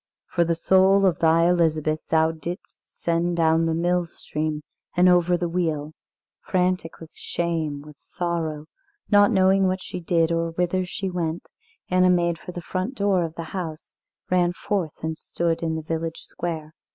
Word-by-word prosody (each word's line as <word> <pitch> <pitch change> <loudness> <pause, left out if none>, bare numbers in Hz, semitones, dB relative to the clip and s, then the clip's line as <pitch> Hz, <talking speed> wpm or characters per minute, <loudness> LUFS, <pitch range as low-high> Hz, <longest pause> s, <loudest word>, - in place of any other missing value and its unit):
For 175 - +3
the 170 0 0
soul 190 +3 +4
of 180 -3 +2
thy 165 +1 +4
Elizabeth 155 -3 +2
thou 160 0 +3
didst 165 +3 -8
send 170 +1 +1
down 165 0 +3
the 160 - 0
mill 175 +1 +1
stream 155 -1 -4 0.3
and 180 +1 +6
over 180 0 +4
the 175 0 -1
wheel." 160 -3 -2 0.5
Frantic 180 -3 -1
with 165 -1 -12
shame, 160 -4 -2
with 150 -1 -13
sorrow, 165 -4 -3 0.5
not 205 0 +6
knowing 190 0 +4
what 185 0 -1
she - - -6
did, 165 -1 +1
or 165 0 -1
whither 180 +2 0
she 190 +1 -4
went, 170 -2 -2 0.5
Anna 185 0 +4
made 170 -2 +2
for - - -8
the 175 -1 -7
front 185 +10 -3
door 200 -5 +2
of 165 -1 -5
the 165 - -5
house, 165 -4 -5 0.4
ran 175 -1 +3
forth 180 -5 -3
and 160 0 -3
stood 170 -1 -1
in 160 -1 -1
the 160 - -4
village 165 +1 -3
square. 160 -3 -5
170 Hz, 170 wpm, -24 LUFS, 160-180 Hz, 0.5 s, and